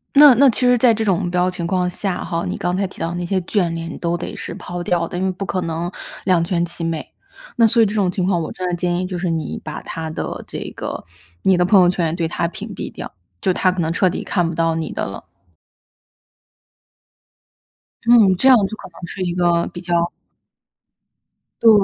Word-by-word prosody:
那 290 -1 +10
那 275 +3 +6
其 240 - -1
实 245 0 +5
在 235 0 +5
这 220 0 -1
种 190 -4 +2
目 175 - -1
标 180 +1 +1
情 175 -2 -4
况 180 0 +1
下 185 +1 -3
哈， 170 -2 -2
你 - - -3
刚 175 +1 -1
才 195 +1 0
提 - - -15
到 165 - -1
的 175 - -4
那 175 0 -3
些 190 +2 0
眷 175 -1 0
恋， 165 0 -5
你 - - -7
都 170 0 -1
得 170 - -6
是 - - -6
抛 175 0 -6
掉 170 -1 0
的， 180 - -6
因 185 - -1
为 190 - +1
不 190 +2 -5
可 185 +1 -2
能 170 +1 -3 0.3
两 180 -3 +3
全 170 0 0
其 170 0 -6
美。 165 -2 -3 0.5
那 230 -1 +5
所 230 +1 +5
以 - - +6
这 205 - -2
种 200 -4 +1
情 180 -1 -1
况， 180 -3 +1
我 160 - -4
真 185 - -4
的 175 - -1
建 175 0 -1
议 180 - -1
就 185 -1 -4
是 175 0 -1
你 165 -1 -3
把 155 - -6
他 160 -1 -5
的 155 - -5
这 - - -6 0.2
个 - - -5 0.4
你 190 - +4
的 180 - +3
朋 195 +2 +5
友 180 - +5
圈 175 -2 0
也 160 - -2
对 170 -1 -1
他 170 +1 -1
屏 170 - -7
蔽 - - -6
掉， - - -8 0.3
就 185 - +1
他 185 +1 +2
可 185 - -5
能 165 -1 0
彻 185 +2 +3
底 180 - -4
看 175 -4 0
不 165 - -4
到 165 0 +1
你 160 -1 -3
的 - - -3
了。 100 - -7 2.8
嗯， 225 -5 +7
这 260 - +3
样 260 - +9
就 220 - -7
可 - - -10
能 175 - -9
是 190 - -7
一 175 -1 -1
个 175 -1 +2
比 175 - -7
较 170 -1 +1 1.5
对， 230 - +7
180 Hz, 260 characters per minute, -20 LUFS, 170-190 Hz, 2.8 s, 那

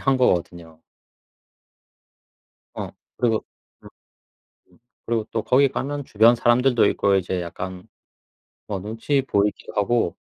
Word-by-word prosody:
한 135 -1 +2
거거든요. 85 -8 -1 1.9
어. - - -5 0.3
그리고 115 -3 0 0.4
음 - - -12 0.8
음 - - -24 0.3
그리고 115 -2 -1
또 110 - -2
거기 135 +2 +4
가면 145 +1 -4
주변 115 +3 +5
사람들도 120 +1 +3
있고 100 -1 +2
이제 95 -1 -1
약간 90 +1 -7 0.8
어 100 -2 -3
눈치 115 +8 -1
보이기도 105 -5 -1
하고 105 -2 +1
110 Hz, 235 characters per minute, -23 LUFS, 95-125 Hz, 1.9 s, 주변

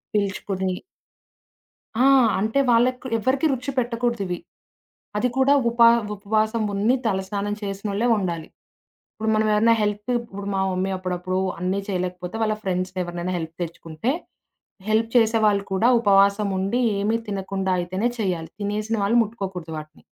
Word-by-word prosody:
పిలుచుకుని 195 -2 -1 1.3
ఆ! - - +5 0.3
అంటే, 220 +7 +1
వాళ్లకి 250 +2 +2
ఎవరికీ 260 +7 +1
రుచి 260 +2 -3
పెట్టకూడదు 235 -2 -1
ఇవి. 180 -1 -3 0.8
అది 250 - +2
కూడా 270 +2 +5 0.2
ఉప 235 0 -2 0.3
ఉపవాసం 215 +2 0
ఉండి 215 +6 +2
తలస్నానం 200 0 -1
చేసినోళ్లే 200 +3 -2
ఉండాలి. 170 -5 -3 0.7
ఇప్పుడు 220 0 -2
మనం 215 0 +2
ఏవైనా 230 +2 +4
హెల్ప్ 210 +2 -2
ఇప్పుడు 200 -4 -8
మా 190 - +1
మమ్మీ 185 +1 -1
అప్పుడప్పుడు 185 0 -3 0.2
అన్నీ 185 +2 -1
చేయలేకపోతే 180 0 -3
వాళ్ల 215 -1 +1
ఫ్రెండ్స్‌ని 185 0 -2
ఎవరినైనా 175 +1 -4
హెల్ప్‌కి 165 +1 -7
తెచ్చుకుంటే, 165 +6 -4 0.8
హెల్ప్ 225 +1 +2
చేసేవాళ్లు 215 -3 +3
కూడా 225 +6 +3
ఉపవాసం 200 0 +4
ఉండి, 200 +7 0 0.2
ఏమీ 220 +3 +1
తినకుండా 195 -1 -2
అయితేనే 185 +7 -1
చేయాలి. 175 -5 -2
తినేసిన 210 +2 -1
వాళ్లు 230 +4 +3
ముట్టుకోకూడదు 190 -7 -6
వాటిని. 155 0 -10
200 Hz, 130 wpm, -23 LUFS, 185-225 Hz, 1.3 s, ఆ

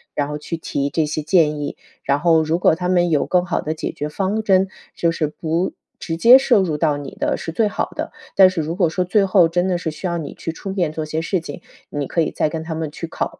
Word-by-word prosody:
然 145 - 0
后 150 0 -4
去 165 +3 -5
提 140 -3 -2
这 160 +1 0
些 155 +1 -3
建 150 -2 +2
议。 145 - -4 0.3
然 140 +1 +1
后 165 0 +4
如 160 +1 0
果 175 - +4
他 180 +2 -2
们 175 -1 +3
有 145 -3 +2
更 180 -1 +2
好 175 - -1
的 155 - -2
解 - - -4
决 150 - -5
方 195 +6 -1
针， 195 -2 +3 0.3
就 170 - +1
是 165 -2 -1
不 165 +4 -2 0.3
直 165 -1 -4
接 235 +9 +8
涉 265 -5 +4
入 170 -5 -1
到 150 -2 +1
你 145 -2 -7
的 - - 0
是 165 - -5
最 215 +6 +1
好 205 - -2
的。 - - -4 0.2
但 190 -1 +8
是 185 -3 -2
如 160 +2 -3
果 175 -3 +2
说 180 +3 -1
最 195 +3 +3
后 185 -3 +5
真 175 +2 0
的 180 -2 +1
是 170 -2 -3
需 170 +4 -5
要 170 -1 -1
你 155 -4 -6
去 165 - -5
出 190 +4 -7
面 175 -5 0
做 155 0 -4
些 155 +1 -2
事 185 +3 -1
情， 150 -3 -8 0.3
你 145 -2 -3
可 170 - 0
以 160 - 0
再 155 - 0
跟 160 0 -4
他 160 0 -5
们 160 -1 -3
去 165 - -6
考 - - -4
165 Hz, 290 characters per minute, -20 LUFS, 155-180 Hz, 0.3 s, 接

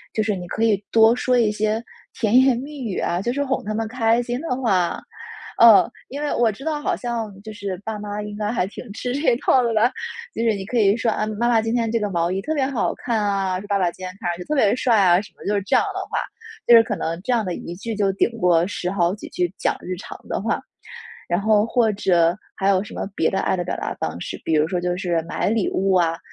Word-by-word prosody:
就 215 - +2
是 210 -1 0
你 180 -1 -7
可 220 - -2
以 210 -3 +2
多 225 +1 +6
说 250 0 +1
一 225 -3 +3
些 215 +2 -1 0.4
甜 220 0 +2
言 260 -2 +4
蜜 285 +4 -7
语 210 -6 -3
啊， 175 +1 -1
就 240 +4 -1
是 285 +2 0
哄 265 -1 -1
他 215 - -2
们 225 0 -2
开 230 0 +1
心 240 +1 -3
的 320 -6 -2
话。 185 -8 +1 0.6
呃， 230 -3 +8 0.2
因 280 +3 -6
为 295 - -1
我 235 -2 +3
知 220 +5 -7
道 310 -1 -1
好 - - 0
像 235 -3 -3
就 220 - -8
是 200 -3 -5
爸 220 -1 -4
妈 205 0 -5
应 210 0 -6
该 210 -1 -2
还 230 -5 0
挺 200 - -9
吃 245 +3 -3
这 280 -2 +2
一 - - 0
套 260 - +4
的 235 -2 0
了。 225 +3 +3 0.4
就 - - -3
是 230 -1 +2
你 195 -1 -6
可 240 +4 -2
以 200 -1 +4
说： 230 -1 0
“啊， 215 - -1
妈 215 +3 0
妈 230 -2 +4
今 225 +2 -1
天 230 -2 0
这 230 - +1
个 210 -1 -1
毛 170 -1 0
衣 190 - -1
特 310 - -2
别 275 -3 +1
好 265 -6 -1
看 235 -3 -1
啊！” 195 -2 0
说： 205 - -10
“爸 200 -1 +1
爸 180 -3 +1
今 185 - -17
天 - - -4
看 - - -1
上 170 - -2
去 180 - -8
特 305 - -1
别 215 -8 +4
帅 245 -3 +2
啊！” 180 -2 +5
什 205 - -14
么 - - -14
就 205 - 0
是 200 - +1
这 195 - +1
样 - - +4
的 - - -4
话， - - -2 0.5
就 240 - +6
是 230 - +8
可 225 - -3
能 165 +2 -3
这 250 - 0
样 230 -2 +2
的 180 -2 -3
1 170 - -7
句 225 +5 -5
就 205 -2 +1
顶 195 - +2
过 175 -4 +3
10 180 -3 -3
好 180 -2 +1
几 205 - -8
句 175 0 -1
讲 - - +1
日 185 0 -5
常 - - -9
的 - - -2
话。 - - -1 0.7
然 175 +2 0
后 215 0 +3
或 230 -1 +2
者 175 -3 +2 0.2
还 195 0 +1
有 190 -1 +3
什 210 - -11
么 - - -4
别 160 - +2
的 195 - -1
爱 - - +1
的 175 - -1
表 - - -3
达 - - -3
方 - - -3
式， - - -5
比 160 - 0
如 155 0 +3
说 180 +1 -1
就 175 0 -1
是 175 -3 0
买 - - -1
礼 220 -2 +1
物 195 0 +1
啊， 165 -2 +2
210 Hz, 295 characters per minute, -22 LUFS, 185-235 Hz, 0.7 s, 呃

